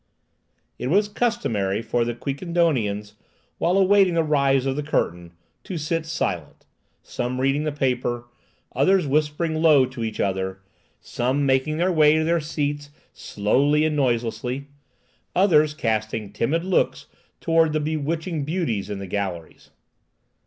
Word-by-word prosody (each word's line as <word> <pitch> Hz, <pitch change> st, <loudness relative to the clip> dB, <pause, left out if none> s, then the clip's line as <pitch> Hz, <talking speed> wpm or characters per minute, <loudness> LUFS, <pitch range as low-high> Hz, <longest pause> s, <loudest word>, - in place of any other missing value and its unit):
It 125 Hz, -, -3 dB
was 200 Hz, +8 st, +3 dB
customary 120 Hz, -, -1 dB
for 120 Hz, +1 st, 0 dB
the 120 Hz, 0 st, -3 dB
Quiquendonians, 135 Hz, -, -1 dB, 0.5 s
while 180 Hz, +3 st, +2 dB
awaiting 195 Hz, -2 st, +4 dB
the 165 Hz, -, +3 dB
rise 140 Hz, -3 st, +2 dB
of 135 Hz, -1 st, 0 dB
the 150 Hz, -, -2 dB
curtain, 85 Hz, -, -2 dB, 0.3 s
to 185 Hz, -, -5 dB
sit 160 Hz, +1 st, -2 dB
silent, 165 Hz, -, -3 dB, 0.4 s
some 125 Hz, +1 st, -4 dB
reading 135 Hz, +3 st, +1 dB
the 155 Hz, -, 0 dB
paper, 125 Hz, -4 st, -1 dB, 0.5 s
others 180 Hz, +7 st, +3 dB
whispering 150 Hz, +3 st, 0 dB
low 150 Hz, -5 st, +6 dB
to 130 Hz, -2 st, -6 dB
each 110 Hz, -1 st, -4 dB
other, 95 Hz, -1 st, -1 dB, 0.4 s
some 130 Hz, +4 st, -1 dB
making 135 Hz, +3 st, +1 dB
their 180 Hz, +3 st, +2 dB
way 155 Hz, -2 st, +5 dB
to 160 Hz, -, +1 dB
their 165 Hz, +1 st, +1 dB
seats 145 Hz, -1 st, -3 dB, 0.2 s
slowly 140 Hz, +9 st, +1 dB
and 155 Hz, -1 st, 0 dB
noiselessly, 125 Hz, +1 st, -1 dB, 0.7 s
others 155 Hz, -5 st, +4 dB
casting 110 Hz, -4 st, -2 dB
timid 155 Hz, +10 st, 0 dB
looks 185 Hz, -1 st, 0 dB, 0.3 s
towards 165 Hz, -1 st, +2 dB
the 155 Hz, -, +1 dB
bewitching 155 Hz, +1 st, -2 dB
beauties 140 Hz, -, -2 dB
in 105 Hz, -, -4 dB
the 100 Hz, -, -6 dB
galleries. 95 Hz, -4 st, -5 dB
145 Hz, 140 wpm, -23 LUFS, 120-160 Hz, 0.7 s, low